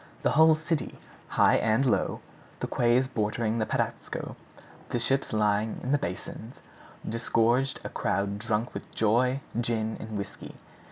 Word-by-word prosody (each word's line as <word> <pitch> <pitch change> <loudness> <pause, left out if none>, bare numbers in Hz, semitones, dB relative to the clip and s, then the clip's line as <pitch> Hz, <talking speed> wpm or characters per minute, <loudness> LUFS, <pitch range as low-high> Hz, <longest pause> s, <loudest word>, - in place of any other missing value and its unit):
The - - +3
whole 160 +1 +6
city, 155 -3 -2 0.3
high - - +4
and 115 +4 +2
low, 125 - +1 0.4
the - - -2
quays 120 +2 +2
bordering 110 -1 -1
the 110 - 0
Patapsco, - - -3 0.5
the 120 - -1
ships 135 +3 0
lying 105 0 +1
in 130 - -2
the 145 - +3
basins, 110 +6 -6 0.5
disgorged 115 +3 +1
a - - -4
crowd 100 +1 -1
drunk 110 +1 -1
with - - -7
joy, 125 +5 +2 0.2
gin, 110 -2 -1
and 110 -1 -5
whisky. 100 -1 -7
115 Hz, 145 wpm, -28 LUFS, 110-130 Hz, 0.5 s, whole